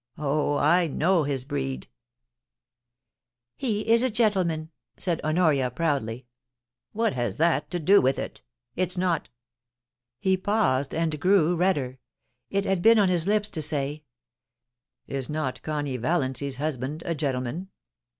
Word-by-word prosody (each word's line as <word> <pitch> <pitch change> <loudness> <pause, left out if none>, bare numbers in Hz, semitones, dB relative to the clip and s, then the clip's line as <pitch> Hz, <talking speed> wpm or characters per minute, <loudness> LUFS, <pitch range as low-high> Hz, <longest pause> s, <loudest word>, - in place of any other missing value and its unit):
Oh, 145 0 0
I 175 0 +3
know 165 +2 +2
his 135 -3 -2
breed' 135 -2 -3 0.8
* 120 0 -65 0.7
He 215 -5 -2
is 230 +1 +5
a 260 - +3
gentleman 185 -9 0
!' - - -53
said 175 -4 -1
Honoria, 155 -5 +2
proudly. 130 -4 -2 0.3
* 120 0 -65
What 225 -1 0
has 120 -5 -2
that 155 -2 +2
to 175 - -2
do 195 +5 +5
with 130 +1 +2
it? - - -6 0.3
Is 180 0 -1
not 180 -3 0 0.5
' 120 0 -65
He 190 +5 +2
paused, 185 -10 +1
and 160 -2 -1
grew 180 -1 +3
redder. 145 -8 0 0.5
It 200 0 0
had 190 -2 0
been 225 +3 +6
on 200 -3 +4
his 175 -1 +1
lips 210 0 +1
to 160 - -2
say, 145 0 -1 0.5
* 120 +2 -63
Is 135 +1 -4
not 150 -4 -3
Connie 145 -4 -3
Valiancy's 135 0 -1
husband 145 +2 -3
a 170 - -1
gentleman 140 +4 -3
155 Hz, 150 wpm, -26 LUFS, 135-185 Hz, 0.8 s, been